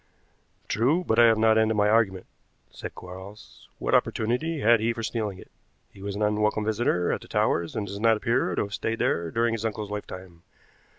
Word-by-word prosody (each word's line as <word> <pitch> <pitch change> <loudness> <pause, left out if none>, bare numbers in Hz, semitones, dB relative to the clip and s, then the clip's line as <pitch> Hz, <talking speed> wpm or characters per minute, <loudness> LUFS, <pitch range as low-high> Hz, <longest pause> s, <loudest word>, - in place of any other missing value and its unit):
"True, 135 - +1
but 115 -8 +1
I 120 - +8
have 115 -1 +4
not 110 0 +4
ended 110 0 +2
my 105 0 +3
argument," 105 -4 +2 0.5
said - - -8
Quarles. 95 +3 -12
"What - - -2
opportunity 140 +8 0
had 115 +1 +5
he 115 +2 0
for 115 0 -6
stealing 110 -4 -3
it? - - -14 0.4
He 95 - -14
was 100 0 -4
an 105 - -1
unwelcome 105 0 +1
visitor 105 -5 +1
at - - -4
the - - -13
Towers, 85 -1 0
and 105 - -2
does 100 0 -7
not 115 0 +4
appear 115 -5 0
to - - 0
have 100 0 -7
stayed 115 +2 -2
there 85 -5 0
during 115 +4 +1
his 115 -1 -3
uncle's 105 -2 -3
lifetime. 90 -4 -8
110 Hz, 200 wpm, -26 LUFS, 100-115 Hz, 0.5 s, I